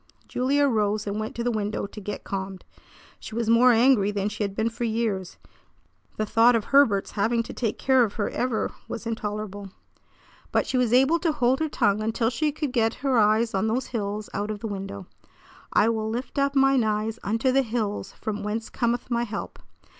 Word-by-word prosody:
Julia 280 +3 +2
arose 215 -3 0
and 205 +1 -3
went 215 0 -4
to 235 - -3
the 245 - +1
window 210 -2 -2
to 210 +1 -9
get 205 +1 -5
calmed. 190 -1 -5 0.5
She 220 - -9
was 230 -1 +1
more 245 +2 +6
angry 235 -3 +4
than 205 0 -1
she 210 0 -3
had 200 -1 -3
been 225 +2 0
for 235 - -5
years. 220 -5 -2 0.8
The 215 - 0
thought 230 +3 +5
of 225 - +1
Herbert's 255 -9 +3
having 230 +3 +1
to - - -8
take 225 -4 -2
care 260 -2 +4
of 210 -3 -2
her 205 - -1
ever 245 -3 -1 0.2
was 230 - -6
intolerable. 210 -3 -4 0.8
But - - +2
she - - -3
was 250 -3 +2
able 270 +7 +4
to 330 -2 +1
hold 255 -3 +1
her 315 -1 0
tongue 205 -5 +1
until 225 +1 0
she 300 +5 0
could 295 -2 -3
get 225 -2 +2
her 260 -4 +3
eyes 215 +2 +3
on 195 +2 +1
those 240 +4 -1
hills 210 -1 -3
out 205 +1 -2
of 215 - -3
the - - -5
window. 195 - -6 0.7
"I 210 - +4
will 220 -1 -1
lift 245 +5 -4
up 280 0 +1
mine 270 -2 +4
eyes 215 +1 -1
unto 225 +5 0
the 270 +1 +4
hills, 220 -5 -3
from 210 -1 -4
whence 215 +2 -4
cometh 240 +1 -1
my 235 0 +1
help." 215 -3 -6
225 Hz, 205 wpm, -25 LUFS, 210-245 Hz, 0.8 s, more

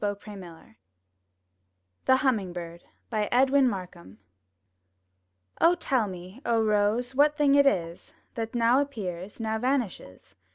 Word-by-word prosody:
rCT 205 -1 0
X 205 - -19
tLtV»UTli 175 - -12 1.3
THE 260 - +5
HUMMING 225 -10 0
BIRD* 170 -1 -8 0.3
Edwin 255 +5 +3
Markham 180 - -8 1.6
Tell 255 -9 0
me, 185 +5 -10
O 235 -4 +1
Rose, 215 +4 +1
what 295 +2 +3
thing 290 -2 +3
it 280 0 +5
is 170 -9 -2 0.2
That 225 0 -5
now 240 +3 +3
appears, 200 -9 -6
now 220 0 -2
vanishes? 220 - -3
220 Hz, 120 wpm, -27 LUFS, 180-260 Hz, 1.6 s, THE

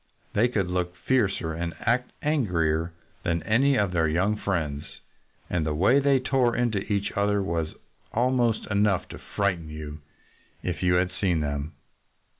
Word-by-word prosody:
They 110 +4 +4
could 110 -6 0
look 90 0 -2
fiercer 95 -6 0
and 85 +1 -4
act 125 +1 0
angrier 85 - +1 0.3
than 85 -1 -1
any 135 +5 +3
of 100 -3 +1
their 85 -2 +2
young 90 +7 +1
friends. 80 -9 -2 0.6
And 90 -3 0
the 75 -1 -1
way 100 - +4
they 140 -1 +3
tore 130 -2 +2
into 120 -4 +1
each 100 0 0
other 100 0 +1
was 85 -4 -2 0.4
almost 120 -1 +1
enough 100 -2 +2
to - - -8
frighten 90 -6 -2
you, 75 -1 -7 0.6
if - - -3
you 90 0 +3
had 90 +1 +2
seen 95 -4 0
them. 70 +1 -3
95 Hz, 155 wpm, -26 LUFS, 85-115 Hz, 0.6 s, They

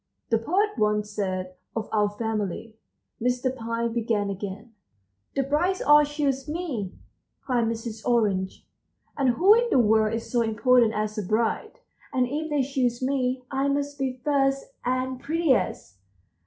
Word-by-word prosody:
"This 225 0 +2
poet 390 - +2
once 210 0 +1
said 185 -3 -3 0.2
of 225 -1 -2
our 210 -1 +2
family," 215 0 -3 0.5
Mr. 250 +2 0
Pine 230 -1 -2
began 220 -4 0
again. 200 +4 -7 0.6
"The 275 - +2
brides 330 +8 +1
all 295 0 +6
choose 285 -2 -1
me," 295 - -3 0.5
cried 245 -3 +1
Mrs. 225 -1 -4
Orange, 205 -6 0 0.5
"and 260 -4 +2
who 380 - +7
in 475 +1 +2
the - - +3
world 220 -1 +3
is 230 - -6
so 240 - +2
important 230 +1 +3
as 215 +1 -2
a - - -2
bride? 220 +4 -1 0.3
And 255 -1 +2
if 305 +5 -3
they 295 -2 +1
choose 255 -3 0
me, 255 -1 0
I 270 +1 0
must 285 0 -1
be 260 -1 -2
first 275 -2 +1
and 255 +1 -1
prettiest." 265 - 0
245 Hz, 150 wpm, -26 LUFS, 215-275 Hz, 0.6 s, who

